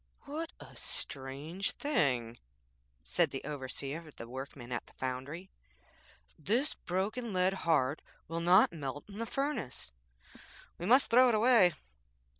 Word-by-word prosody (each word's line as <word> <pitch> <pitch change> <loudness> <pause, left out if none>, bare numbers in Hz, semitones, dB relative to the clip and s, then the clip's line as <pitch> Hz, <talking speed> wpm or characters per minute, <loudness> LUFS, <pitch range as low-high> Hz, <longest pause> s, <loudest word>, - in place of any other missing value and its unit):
'What 315 +3 -5
a - - -12
strange 140 +8 -2
thing!' 125 - 0 0.6
said - - +2
the - - -5
overseer 145 +2 -4
of 150 - -14
the 115 - -8
workmen 130 0 -7
at 120 - -3
the - - -18
foundry.'This 130 - -5
broken 205 +5 -2
lead 185 +1 +3 0.2
heart 145 -2 +3 0.3
will 165 +1 -3
not 180 +2 +6
melt 145 -2 -5
in 205 +1 -9
the 230 - -2
furnace. 275 - -3 0.9
We 175 - -3
must 255 +3 +6
throw 250 +2 +7
it 230 - +3
away.' 215 -6 +6
165 Hz, 130 wpm, -33 LUFS, 130-215 Hz, 0.9 s, throw